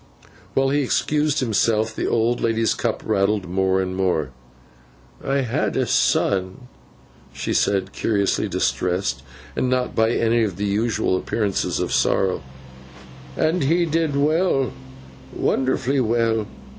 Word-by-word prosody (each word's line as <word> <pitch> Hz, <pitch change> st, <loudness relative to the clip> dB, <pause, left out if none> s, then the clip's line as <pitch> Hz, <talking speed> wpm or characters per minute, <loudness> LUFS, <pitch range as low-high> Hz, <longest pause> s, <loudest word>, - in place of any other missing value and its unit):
While 135 Hz, 0 st, +3 dB
he 145 Hz, +1 st, +1 dB
excused 150 Hz, +2 st, 0 dB
himself, 110 Hz, -1 st, +1 dB
the -, -, -2 dB
old 115 Hz, +1 st, +1 dB
lady's 115 Hz, 0 st, +1 dB
cup 115 Hz, -2 st, -2 dB
rattled 100 Hz, -2 st, +1 dB
more 95 Hz, +1 st, +1 dB
and 95 Hz, 0 st, -4 dB
more. 90 Hz, -7 st, 0 dB, 0.9 s
'I 135 Hz, 0 st, 0 dB
had 120 Hz, -4 st, -1 dB
a -, -, +2 dB
son,' 95 Hz, +2 st, +1 dB, 0.7 s
she -, -, -3 dB
said, 95 Hz, -1 st, +1 dB
curiously 100 Hz, -3 st, 0 dB
distressed, 90 Hz, +2 st, -1 dB, 0.3 s
and 130 Hz, -, 0 dB
not 125 Hz, 0 st, 0 dB
by 110 Hz, 0 st, +2 dB
any 115 Hz, 0 st, +2 dB
of 100 Hz, -5 st, -2 dB
the 105 Hz, -, -2 dB
usual 105 Hz, -1 st, 0 dB
appearances 100 Hz, +1 st, -1 dB
of -, -, -2 dB
sorrow; 95 Hz, -1 st, +1 dB, 1.0 s
'and 160 Hz, -1 st, +1 dB
he 170 Hz, +4 st, +2 dB
did 160 Hz, -2 st, 0 dB
well, 145 Hz, -2 st, +1 dB, 0.6 s
wonderfully 135 Hz, +1 st, 0 dB
well. 115 Hz, -2 st, +1 dB
115 Hz, 130 wpm, -22 LUFS, 100-135 Hz, 1.0 s, While